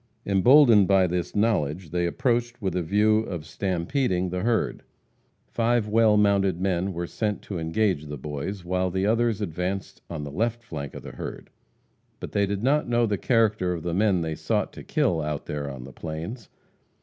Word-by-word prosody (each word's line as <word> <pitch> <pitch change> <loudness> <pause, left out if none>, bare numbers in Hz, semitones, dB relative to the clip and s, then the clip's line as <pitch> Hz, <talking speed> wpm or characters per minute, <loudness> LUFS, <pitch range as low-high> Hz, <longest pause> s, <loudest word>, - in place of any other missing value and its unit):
Emboldened 110 +1 +6
by 95 -1 +4
this 90 -1 -2
knowledge, 90 -7 0
they 85 0 0
approached 120 +5 0
with 95 -4 -2
a 90 - +1
view 105 +5 +3
of 90 -8 -5
"stampeding" 90 - -1
the 90 +1 -3
herd. 115 +1 0 0.6
Five 115 -1 +1
well 110 0 +4
mounted 100 -3 +2
men 95 0 0
were 85 -1 -3
sent 105 +3 -3
to 95 -4 -5
engage 80 -1 0
the 75 0 -6
Boys 75 +8 -5
while 90 +1 0
the 95 +2 -1
others 115 0 +1
advanced 90 +1 -3
on 80 -3 -5
the 70 - -6
left 115 +7 -1
flank 70 -9 -7
of - - -8
the - - -8
herd. - - -8 0.7
But - - -7
they 100 -1 +1
did 100 +1 -3
not 140 0 +2
know 120 0 +3
the 105 -3 -1
character 110 -6 +2
of 85 - -5
the 85 -1 -2
men 95 -1 +2
they 80 -1 -2
sought - - -1
to - - -10
kill 80 -3 +1
out 75 -1 -3
there 70 -1 -4
on 65 -2 -7
the 65 +1 -11
plains. 85 - -6
95 Hz, 185 wpm, -25 LUFS, 85-110 Hz, 0.7 s, Emboldened